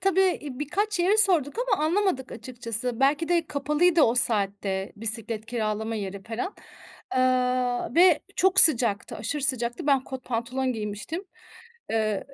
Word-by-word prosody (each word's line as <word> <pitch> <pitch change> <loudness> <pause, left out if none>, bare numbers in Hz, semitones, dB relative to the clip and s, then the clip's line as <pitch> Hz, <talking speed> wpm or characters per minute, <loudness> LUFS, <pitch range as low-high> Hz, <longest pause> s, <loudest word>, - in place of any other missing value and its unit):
tabii, 385 0 +1
eee, 300 -8 -2
birkaç 390 +8 -2
yere 370 +4 +2
sorduk 355 -9 +5
ama 395 -9 0
anlamadık 335 -6 -1
açıkçası. 235 0 -4
Belki 290 +5 +1
de 340 -2 0
kapalıydı 300 +4 +1
o 235 -3 +2
saatte 200 -4 +1
bisiklet 220 0 -2
kiralama 220 -1 -4
yeri 200 -2 -6
felan. 230 - -6 0.6
Eee, 255 -1 -1
ve 345 -2 +4 0.2
çok 380 +1 +5
sıcaktı, 235 -9 +5
aşırı 250 +7 -4
sıcaktı. 255 +3 0
Ben 275 -3 +1
kot 260 -1 -9
pantolon 255 +2 -3
giymiştim. 215 - -6 0.7
Eee 215 -2 -2
255 Hz, 135 wpm, -24 LUFS, 225-325 Hz, 0.7 s, sorduk